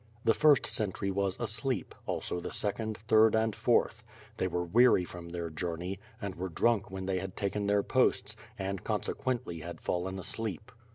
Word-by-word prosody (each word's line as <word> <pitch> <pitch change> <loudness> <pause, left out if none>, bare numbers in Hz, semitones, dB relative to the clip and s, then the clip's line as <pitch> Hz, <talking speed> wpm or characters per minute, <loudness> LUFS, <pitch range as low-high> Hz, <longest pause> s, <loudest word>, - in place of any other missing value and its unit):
The 115 - +6
first 150 0 +5
sentry 100 -2 -1
was 95 -1 0
asleep; - - -2
also 90 - -2
the - - -5
second, 110 +1 -2
third, 110 -1 +6
and 110 -1 +1
fourth; - - +2 0.3
they - - +1
were 90 - -1
weary 110 +2 +5
from 85 -1 -9
their 85 -1 -4
journey, 90 +4 -3 0.2
and 100 -3 -4
were 95 +2 -4
drunk 105 +4 +2
when 95 0 -5
they 95 -1 0
had 95 0 -6
taken 100 0 -1
their 100 0 +3
posts, - - +2 0.2
and 95 0 -3
consequently 120 -10 -2
had 85 +2 -7
fallen 95 +2 -2
asleep. 105 +1 -4
95 Hz, 170 wpm, -31 LUFS, 90-110 Hz, 0.3 s, The